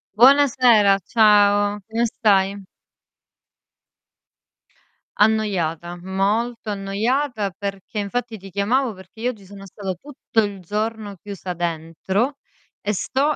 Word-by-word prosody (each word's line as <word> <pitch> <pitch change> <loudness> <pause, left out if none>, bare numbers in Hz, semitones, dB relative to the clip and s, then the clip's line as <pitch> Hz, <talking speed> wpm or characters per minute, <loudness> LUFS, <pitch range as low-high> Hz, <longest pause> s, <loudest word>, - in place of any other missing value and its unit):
Buonasera! 245 -5 +6
Ciao, 205 -2 +4
come 225 +2 0
stai? 200 -4 +2 2.6
Annoiata, 180 -6 +1
molto 210 +5 -1
annoiata 210 +3 -1
perché 195 +2 -6
infatti, 225 +3 -3
ti 195 0 -12
chiamavo 220 +6 0
perché 190 +2 -16
io 240 +2 0
oggi 210 -5 -15
sono 195 +1 -11
stata 195 0 -5
tutto 230 +2 -2
il 200 -2 -4
giorno 210 +2 -3
chiusa 195 -3 -6
dentro, 175 - -2 0.4
e 210 - -2
sto 275 +9 0
205 Hz, 105 wpm, -22 LUFS, 195-230 Hz, 2.6 s, Buonasera